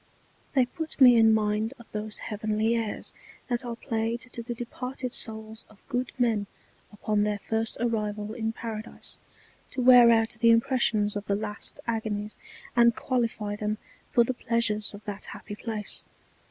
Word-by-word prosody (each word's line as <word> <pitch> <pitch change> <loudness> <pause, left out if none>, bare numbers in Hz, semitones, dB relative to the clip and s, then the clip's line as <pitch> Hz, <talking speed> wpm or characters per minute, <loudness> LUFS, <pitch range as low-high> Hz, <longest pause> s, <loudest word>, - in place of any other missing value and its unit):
They 260 -2 +5
put 320 +4 -6
me 250 -3 +9
in 225 -1 +6
mind 215 +2 +1
of 235 - -16
those 215 0 -3
heavenly 215 +1 0
Airs 225 -2 -2 0.4
that 240 +1 0
are 240 -1 -4
played 230 0 -2
to 250 -2 -7
the 240 +1 -5
departed 250 +1 -5
Souls 220 0 -1
of 215 - -18
good 250 -1 -1
Men 225 -5 +1 0.4
upon 210 0 0
their 210 0 +1
first 225 +2 -2
Arrival 210 -2 -1
in 225 -1 -2
Paradise, 225 -1 -7 0.5
to - - -6
wear 245 -1 +8
out 225 -1 +3
the 230 -1 +5
Impressions 230 -3 +3
of 205 0 -4
the 200 - +2
last 210 0 -3
Agonies, 215 -2 -3 0.4
and 235 -1 +5
qualify 230 -5 -1
them 210 +1 -2 0.3
for 235 - +5
the 255 - -1
Pleasures 225 -4 0
of 205 - -13
that 205 -1 -5
happy - - -8
Place. 210 -1 -2
225 Hz, 160 wpm, -27 LUFS, 210-235 Hz, 0.5 s, me